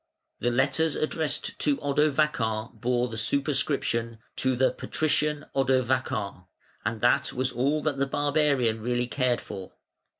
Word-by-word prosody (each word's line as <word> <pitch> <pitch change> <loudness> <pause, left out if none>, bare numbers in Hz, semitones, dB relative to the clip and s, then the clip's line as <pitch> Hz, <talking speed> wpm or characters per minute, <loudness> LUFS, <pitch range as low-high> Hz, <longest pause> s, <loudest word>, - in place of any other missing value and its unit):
The 120 - +1
letters 140 +6 +2
addressed 155 -1 -1
to 145 -2 +2
Odovacar 140 -6 +1
bore 120 +2 0
the 110 -2 -5
superscription 130 -3 0 0.2
"To 130 -1 +1
the 130 +2 +3
Patrician 150 -1 0
Odovacar", 130 -8 0 0.4
and 110 0 -2
that 125 +3 +3
was 130 +1 0
all 145 +5 0
that 145 -3 -1
the 140 - +1
barbarian 145 -5 +1
really 120 +2 0
cared 125 -1 0
for. 95 -1 -8
130 Hz, 130 wpm, -27 LUFS, 120-145 Hz, 0.4 s, the